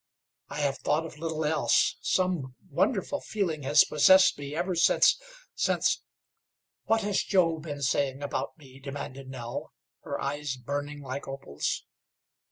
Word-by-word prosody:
I 150 Hz, -, -4 dB
have 140 Hz, -1 st, 0 dB
thought 155 Hz, +2 st, +1 dB
of 155 Hz, -2 st, -10 dB
little 160 Hz, -1 st, -2 dB
else. 155 Hz, +1 st, +2 dB
Some 175 Hz, -9 st, 0 dB, 0.2 s
wonderful 265 Hz, +4 st, 0 dB
feeling 175 Hz, -8 st, -2 dB
has 145 Hz, +2 st, +6 dB
possessed 190 Hz, +5 st, +6 dB
me 145 Hz, +1 st, -6 dB
ever 180 Hz, +3 st, -1 dB
since 170 Hz, -, +4 dB, 0.3 s
since -, -, +1 dB, 0.4 s
" -, -, -64 dB
"What 225 Hz, 0 st, +3 dB
has 205 Hz, -1 st, +1 dB
Joe 170 Hz, -5 st, +2 dB
been 145 Hz, -2 st, -6 dB
saying 135 Hz, +1 st, 0 dB
about 140 Hz, 0 st, -3 dB
me?" 135 Hz, -3 st, -15 dB
demanded 135 Hz, -1 st, -7 dB
Nell, 120 Hz, -2 st, -6 dB, 0.3 s
her -, -, -4 dB
eyes 140 Hz, -1 st, -3 dB
burning 145 Hz, +3 st, -4 dB
like 135 Hz, +1 st, -5 dB
opals. 135 Hz, -, -3 dB
145 Hz, 145 wpm, -28 LUFS, 135-165 Hz, 0.4 s, has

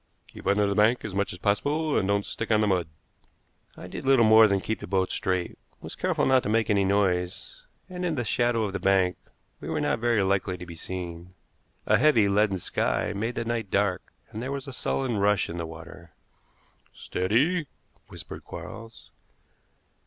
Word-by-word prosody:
Keep -, -, -10 dB
under 100 Hz, +1 st, +3 dB
the 100 Hz, -, 0 dB
bank 110 Hz, +4 st, +3 dB
as 105 Hz, -, -5 dB
much 100 Hz, +1 st, -1 dB
as 90 Hz, -, -8 dB
possible, 145 Hz, -, 0 dB
and 95 Hz, -, +1 dB
don't 100 Hz, 0 st, +1 dB
stick 110 Hz, -, -5 dB
on 110 Hz, -1 st, +4 dB
the -, -, +3 dB
mud." 90 Hz, -5 st, +1 dB, 0.9 s
I -, -, -9 dB
did -, -, -7 dB
little 130 Hz, -3 st, +5 dB
more 110 Hz, 0 st, +7 dB
than 100 Hz, -1 st, +1 dB
keep 110 Hz, +3 st, -3 dB
the -, -, -8 dB
boat 95 Hz, 0 st, 0 dB
straight, 95 Hz, -2 st, -2 dB, 0.2 s
was -, -, -9 dB
careful -, -, 0 dB
not 130 Hz, -1 st, +4 dB
to -, -, -4 dB
make 110 Hz, 0 st, +2 dB
any 100 Hz, -1 st, +3 dB
noise, 95 Hz, -, -1 dB, 0.2 s
and 180 Hz, -1 st, -6 dB
in 170 Hz, -3 st, 0 dB
the 120 Hz, -, -1 dB
shadow 120 Hz, +1 st, +1 dB
of 100 Hz, -3 st, -3 dB
the 100 Hz, -, -2 dB
bank 95 Hz, -1 st, +2 dB, 0.4 s
we -, -, -7 dB
were -, -, -1 dB
not -, -, 0 dB
very 115 Hz, -3 st, +2 dB
likely 95 Hz, -1 st, 0 dB
to 90 Hz, -, -9 dB
be 85 Hz, -1 st, -10 dB
seen. 90 Hz, 0 st, -7 dB, 0.5 s
A -, -, +3 dB
heavy, 120 Hz, -9 st, +4 dB
leaden 100 Hz, 0 st, +2 dB
sky 90 Hz, -, -1 dB
made 115 Hz, +5 st, -2 dB
the 115 Hz, -, -3 dB
night 115 Hz, -3 st, -2 dB
dark, 100 Hz, -2 st, 0 dB, 0.2 s
and 110 Hz, -, -6 dB
there 130 Hz, +3 st, -4 dB
was 140 Hz, 0 st, -5 dB
a 135 Hz, -, -7 dB
sullen 125 Hz, -2 st, -1 dB
rush 100 Hz, -2 st, +2 dB
in 85 Hz, -, -5 dB
the 85 Hz, -, -4 dB
water. 85 Hz, +1 st, -11 dB, 0.9 s
"Steady!" 140 Hz, -, 0 dB, 0.4 s
whispered -, -, -9 dB
Quarles. 115 Hz, 0 st, -10 dB
105 Hz, 195 wpm, -26 LUFS, 95-120 Hz, 0.9 s, more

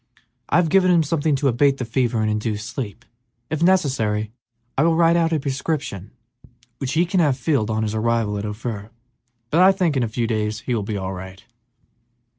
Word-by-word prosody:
I -, -, +1 dB
have 170 Hz, -2 st, +3 dB
given 185 Hz, +1 st, +4 dB
him 170 Hz, -2 st, +4 dB
something 150 Hz, -1 st, 0 dB
to 140 Hz, +1 st, 0 dB
abate 135 Hz, +2 st, +3 dB
the 125 Hz, -, -3 dB
fever 120 Hz, -1 st, 0 dB
and 110 Hz, -, +1 dB
induce 105 Hz, 0 st, -2 dB
sleep. 115 Hz, -2 st, -6 dB, 0.5 s
If 155 Hz, 0 st, -2 dB
necessary, 130 Hz, -, +1 dB, 0.4 s
I -, -, +2 dB
will 165 Hz, +1 st, +3 dB
write 165 Hz, 0 st, +4 dB
out 165 Hz, -1 st, +2 dB
a 160 Hz, -, +1 dB
prescription 135 Hz, -, -3 dB, 0.7 s
which 135 Hz, -2 st, -3 dB
he 165 Hz, +2 st, +3 dB
can 180 Hz, +2 st, 0 dB
have 145 Hz, -6 st, +2 dB
filled 135 Hz, -5 st, 0 dB
on 110 Hz, 0 st, 0 dB
his 105 Hz, -1 st, -2 dB
arrival 110 Hz, -1 st, 0 dB
at 100 Hz, -, -4 dB
Ophir, 105 Hz, 0 st, -5 dB, 0.6 s
but 165 Hz, -, +4 dB
I 190 Hz, +1 st, +8 dB
think 180 Hz, -6 st, 0 dB
in 130 Hz, -, +1 dB
a 120 Hz, -, +1 dB
few 115 Hz, +1 st, -1 dB
days 110 Hz, -1 st, -2 dB
he 125 Hz, -, -2 dB
will 115 Hz, -, 0 dB
be 105 Hz, +1 st, -3 dB
all 95 Hz, 0 st, -4 dB
right." 95 Hz, +1 st, -9 dB
125 Hz, 205 wpm, -22 LUFS, 110-160 Hz, 0.7 s, I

